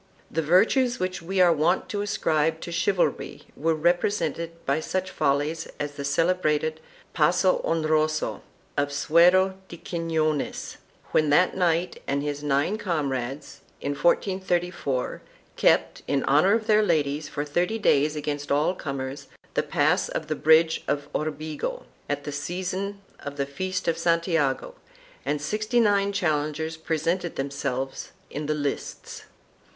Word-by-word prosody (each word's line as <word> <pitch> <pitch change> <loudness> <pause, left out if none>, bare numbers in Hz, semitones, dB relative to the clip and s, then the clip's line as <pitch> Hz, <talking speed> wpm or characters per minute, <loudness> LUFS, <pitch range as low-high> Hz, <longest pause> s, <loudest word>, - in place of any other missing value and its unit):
The 165 - 0
virtues 225 - +3
which 185 0 -2
we 190 +3 -2
are 175 -2 +6
wont 165 +4 +1
to 205 -2 -2
ascribe 160 -5 +1
to 170 - -6
chivalry 185 +2 0
were 160 +2 +1
represented 170 0 0
by 140 +3 +1
such 185 +3 -2
follies 145 +4 0
as 145 0 -2
the 145 -1 -7
celebrated 155 +1 +1 0.3
Passo 180 +4 +3
Honroso 155 -1 0 0.3
of 145 0 0
Suero 180 +6 +4
de 170 - -9
Quinones, 160 -3 -2 0.3
when 155 -1 +3
that 180 +5 +4
knight 175 -1 0
and 140 +1 0
his 145 -1 -3
nine 145 +8 +1
comrades, 140 - -3 0.2
in - - -2
1434, 175 -3 0 0.3
kept, - - +2
in 140 -1 +1
honor 155 +8 +4
of 225 -1 -2
their 215 -1 +4
ladies, 150 -5 0
for 145 - -3
thirty 175 +8 0
days 150 -7 +3
against 145 -1 -3
all 150 +5 +3
comers, 140 -3 -5 0.3
the - - +2
pass - - +1
of - - -3
the - - -2
Bridge 160 +1 +4
of 145 0 -1
Orbigo, 155 - -3 0.3
at 145 0 -2
the 145 - -5
season 185 +6 -3 0.2
of 145 0 -7
the 140 - 0
feast 185 +7 -4
of 165 - +1
Santiago 165 - +1 0.5
and 150 - 0
sixty 215 +10 0
nine 200 -3 +3
challengers 160 -4 -1
presented 165 +2 -1
them 135 +1 -3
selves 135 -1 -4 0.2
in 150 +1 -4
the 155 - 0
lists. 145 -2 -4
160 Hz, 140 wpm, -25 LUFS, 145-180 Hz, 0.5 s, are